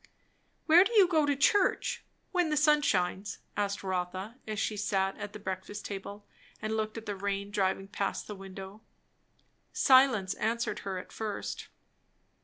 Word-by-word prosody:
"Where 340 +3 +8
do 395 - -2
you 405 -5 +7
go 315 -4 +2
to 285 - +2
church? 375 +8 +2 0.3
when 355 -3 +2
the 305 - +1
sun 300 0 +5
shines," 190 -5 0 0.2
asked 200 -1 -1
Rotha, 185 +4 -3
as 215 -1 -3
she 215 - -1
sat 195 -2 0
at 205 0 -5
the 210 - -8
breakfast 195 +1 -5
table 200 +1 -7 0.3
and 215 +1 -2
looked 215 0 -2
at 225 - -7
the 205 - -3
rain 200 +1 -3
driving 195 -1 0
past 200 0 -2
the 210 - -6
window. 195 +1 -9 0.9
Silence 255 -8 +5
answered 230 +2 -1
her 195 -1 -4
at 180 - -8
first. 215 -2 -4
205 Hz, 160 wpm, -30 LUFS, 195-250 Hz, 0.9 s, Where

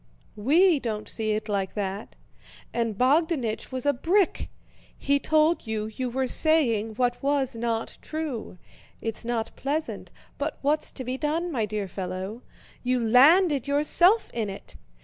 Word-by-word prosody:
We 310 - +4
don't 220 -4 -4
see 215 -1 -1
it 215 +1 -3
like 200 -2 -2
that. 200 0 -4 0.6
And 230 -3 -1
Bogdánich 265 -3 +1
was 255 0 -4
a 285 - +4
brick: 355 +8 +1 0.5
he 280 0 +1
told 310 -1 +2
you 220 0 -3
you 255 -1 -2
were 260 +2 -1
saying 240 -7 +2
what 245 +1 0
was 275 -3 0
not 230 -1 -3
true. 300 -11 -5 0.4
It's 225 0 -4
not 230 -1 -3
pleasant, 300 +3 -3 0.3
but 290 +1 -2
what's 300 +2 +1
to 260 - -6
be 255 +1 -4
done, 325 +3 -1
my 225 -7 -1
dear 210 -1 -3
fellow? 190 +4 -5 0.4
You 250 0 +1
landed 280 - +5
yourself 345 +9 +3
in 225 -3 -2
it. 195 - -9
250 Hz, 150 wpm, -26 LUFS, 220-300 Hz, 0.6 s, landed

